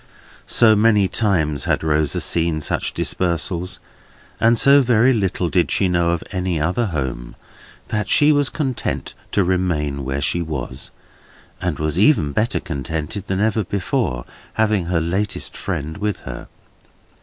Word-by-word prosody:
So 110 Hz, -2 st, +5 dB
many 105 Hz, -2 st, +4 dB
times 80 Hz, -, 0 dB
had -, -, 0 dB
Rosa 75 Hz, -1 st, +1 dB
seen 85 Hz, -2 st, +1 dB
such -, -, -2 dB
dispersals, 90 Hz, 0 st, -2 dB, 0.6 s
and 115 Hz, +1 st, +4 dB
so 140 Hz, +4 st, +6 dB
very 125 Hz, 0 st, +4 dB
little 95 Hz, -5 st, 0 dB
did 85 Hz, +1 st, +1 dB
she 95 Hz, -, +2 dB
know 85 Hz, -1 st, +1 dB
of 85 Hz, -1 st, -1 dB
any 90 Hz, -3 st, -1 dB
other 90 Hz, +10 st, 0 dB
Home, 65 Hz, -8 st, -4 dB, 0.5 s
that 105 Hz, -3 st, -2 dB
she 150 Hz, 0 st, +5 dB
was 145 Hz, -3 st, +2 dB
contented 130 Hz, -1 st, -3 dB, 0.2 s
to 100 Hz, -, +3 dB
remain 85 Hz, -6 st, -1 dB
where 65 Hz, +1 st, -2 dB
she 85 Hz, +5 st, +1 dB
was, 70 Hz, -5 st, -5 dB, 0.7 s
and -, -, -1 dB
was 75 Hz, +2 st, -1 dB
even 100 Hz, -, +4 dB
better 110 Hz, +10 st, 0 dB
contented 80 Hz, -, -5 dB
than 95 Hz, 0 st, -1 dB
ever 110 Hz, +1 st, +1 dB
before, 90 Hz, -10 st, -2 dB, 0.3 s
having 110 Hz, -5 st, +1 dB
her 90 Hz, -1 st, +1 dB
latest 95 Hz, +5 st, -2 dB
friend 80 Hz, +3 st, -4 dB
with 105 Hz, -1 st, -2 dB
her. -, -, -8 dB
90 Hz, 145 wpm, -20 LUFS, 80-105 Hz, 0.7 s, so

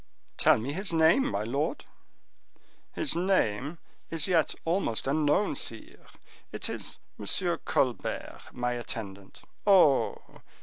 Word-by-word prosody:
"Tell -, -, +5 dB
me 130 Hz, +6 st, -4 dB
his 190 Hz, +4 st, -1 dB
name, 165 Hz, +11 st, +4 dB
my 100 Hz, -, -2 dB
lord." 140 Hz, -, -2 dB, 1.1 s
"His 315 Hz, -, +1 dB
name 165 Hz, -, 0 dB, 0.3 s
is 165 Hz, -2 st, -1 dB
yet 170 Hz, -4 st, +2 dB
almost 165 Hz, -, 0 dB
unknown, 150 Hz, +5 st, +2 dB
sire; 115 Hz, -4 st, -5 dB, 0.4 s
it -, -, -3 dB
is -, -, -3 dB, 0.2 s
M. -, -, -7 dB, 0.4 s
Colbert, -, -, -1 dB
my 125 Hz, 0 st, -2 dB
attendant. 100 Hz, -5 st, -7 dB, 0.2 s
Oh! 180 Hz, -9 st, +3 dB
150 Hz, 115 wpm, -28 LUFS, 120-175 Hz, 1.1 s, Tell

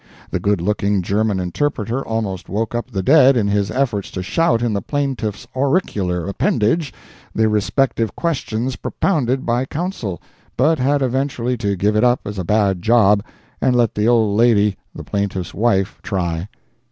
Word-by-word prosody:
The -, -, -1 dB
good 100 Hz, -3 st, 0 dB
looking 100 Hz, 0 st, 0 dB
German 105 Hz, +1 st, 0 dB
interpreter 115 Hz, -, -2 dB
almost 110 Hz, -5 st, -3 dB
woke 110 Hz, +4 st, -2 dB
up 120 Hz, +2 st, -3 dB
the 95 Hz, -5 st, -3 dB
dead 135 Hz, +1 st, +6 dB
in 105 Hz, -3 st, +1 dB
his 100 Hz, -1 st, +1 dB
efforts 120 Hz, -7 st, -1 dB
to 95 Hz, -, -5 dB
shout 120 Hz, -, +1 dB
in 120 Hz, -3 st, 0 dB
the 100 Hz, -, -1 dB
plaintiff's 130 Hz, -7 st, -3 dB
auricular 105 Hz, -, 0 dB
appendage 115 Hz, -, 0 dB, 0.4 s
the 110 Hz, 0 st, +3 dB
respective 110 Hz, +1 st, 0 dB
questions 130 Hz, -6 st, -2 dB
propounded 135 Hz, -8 st, -1 dB
by 120 Hz, +2 st, 0 dB
counsel, 135 Hz, -, -4 dB, 0.4 s
but 155 Hz, +5 st, +3 dB
had 140 Hz, +2 st, +2 dB
eventually 125 Hz, -1 st, -1 dB
to 100 Hz, -3 st, -1 dB
give 105 Hz, +3 st, +1 dB
it 105 Hz, -, +3 dB
up 125 Hz, 0 st, +3 dB
as 100 Hz, -1 st, -5 dB
a -, -, -2 dB
bad 100 Hz, -1 st, +1 dB
job 105 Hz, -2 st, +4 dB, 0.4 s
and 130 Hz, -2 st, +2 dB
let 120 Hz, -3 st, +2 dB
the 105 Hz, +1 st, 0 dB
old 110 Hz, -4 st, +3 dB
lady 105 Hz, -3 st, +3 dB, 0.2 s
the -, -, -7 dB
plaintiff's 100 Hz, -3 st, -3 dB
wife, 100 Hz, -3 st, 0 dB
try. 90 Hz, -2 st, -3 dB
110 Hz, 165 wpm, -19 LUFS, 100-130 Hz, 0.4 s, dead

